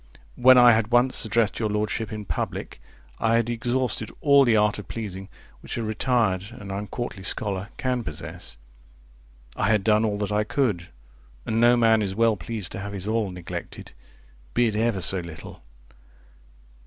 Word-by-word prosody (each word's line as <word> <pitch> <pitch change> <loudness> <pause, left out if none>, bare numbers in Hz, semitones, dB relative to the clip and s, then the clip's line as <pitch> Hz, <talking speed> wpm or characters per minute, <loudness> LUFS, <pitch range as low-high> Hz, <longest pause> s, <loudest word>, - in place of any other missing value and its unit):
When 130 +1 +7
I 120 -1 +8
had 110 -1 +2
once 120 +1 +2
addressed 110 -1 +1
your 110 -2 0
Lordship 105 +1 -2
in 105 -1 -6
public, - - -4 0.4
I 115 0 +2
had 115 0 +1
exhausted 120 -2 -1
all 140 -1 +5
the 115 -3 +4
art 105 0 +2
of 100 - -9
pleasing 95 -4 -6 0.3
which - - -7
a 115 - -2
retired 110 -3 0
and 105 -4 -9
uncourtly 105 +1 -5
scholar 100 +1 -1
can 125 -2 -1
possess. 80 - -7 1.0
I 105 - 0
had 105 -3 +2
done 105 +1 +3
all 105 -2 0
that 105 -1 -3
I 105 +1 +2
could; 105 -7 -1 0.6
and 110 +1 0
no 120 +1 +6
man 115 -2 +4
is 95 -2 -2
well 115 0 +3
pleased 100 +1 -4
to - - -6
have 100 +1 -6
his 100 0 -5
all 110 -2 0
neglected, 90 -2 -8 0.6
be 120 - +4
it 110 -2 -1
ever 110 -3 0
so 95 +1 +2
little. 85 -3 -10
110 Hz, 170 wpm, -25 LUFS, 100-115 Hz, 1.0 s, I